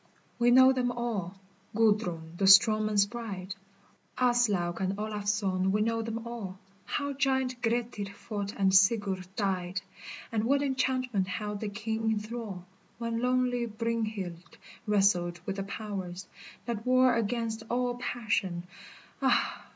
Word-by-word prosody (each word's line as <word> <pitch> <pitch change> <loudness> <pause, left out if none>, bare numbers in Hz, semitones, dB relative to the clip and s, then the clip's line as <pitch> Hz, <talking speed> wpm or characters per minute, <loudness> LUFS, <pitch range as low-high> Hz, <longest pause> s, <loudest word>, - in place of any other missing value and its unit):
We 240 0 +4
know 260 +2 +7
them 250 -1 0
all, 225 -7 -3 0.4
Gudrun 195 -7 +1
the 195 +2 +1
strong 215 +2 +7
men's 205 -2 +3
bride, 200 -4 -6 0.6
Aslaug 235 -9 +2
and 190 +1 -1
Olafson 205 -3 0
we 210 +2 +1
know 230 0 0
them 225 +1 -4
all, 220 -6 -6 0.3
How 285 0 -2
giant 265 -2 0
Grettir 230 -3 -1
fought 205 -1 -5
and 190 -1 +3
Sigurd 195 -1 +3
died, 190 -2 -1 0.5
And 220 -1 0
what 280 +3 +2
enchantment 255 -7 0
held 210 +1 -4
the 215 - -3
king 220 +1 -2
in 220 -1 +1
thrall 210 -4 -6 0.3
When 230 0 -2
lonely 250 -1 +1
Brynhild 215 -6 -4 0.3
wrestled 180 -4 +2
with 195 0 -3
the 195 - -2
powers 195 -3 -5 0.4
That 230 -2 -3
war 255 0 +4
against 230 0 -1
all 245 0 0
passion, 205 -8 -1 0.6
ah - - +1
215 Hz, 135 wpm, -29 LUFS, 195-240 Hz, 0.6 s, know